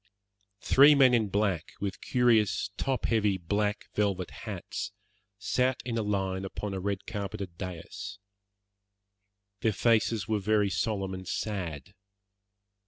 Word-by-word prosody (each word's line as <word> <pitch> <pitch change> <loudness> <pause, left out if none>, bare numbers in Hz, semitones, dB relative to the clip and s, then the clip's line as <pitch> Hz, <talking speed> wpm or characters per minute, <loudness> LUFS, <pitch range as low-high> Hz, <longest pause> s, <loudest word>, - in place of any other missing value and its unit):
Three 145 +2 +7
men 130 -3 +6
in 110 -4 +2
black, 100 -4 0
with 100 -1 -4
curious, 115 -5 +2
top 130 +2 -1
heavy, 105 -4 +2
black 105 +4 -1
velvet 100 -3 0
hats, - - -6 0.4
sat 125 +5 +1
in 120 -2 -2
a 115 - +1
line 95 -2 -1
upon 100 +1 -4
a 95 - -2
red 100 0 -3
carpeted 100 -4 -5
dais. 90 +1 -6 1.4
Their 110 -1 +1
faces 110 -2 +2
were 110 -1 +1
very 105 0 +2
solemn 100 -2 -1
and 95 0 -7
sad. 90 -5 -4
105 Hz, 125 wpm, -29 LUFS, 95-110 Hz, 1.4 s, Three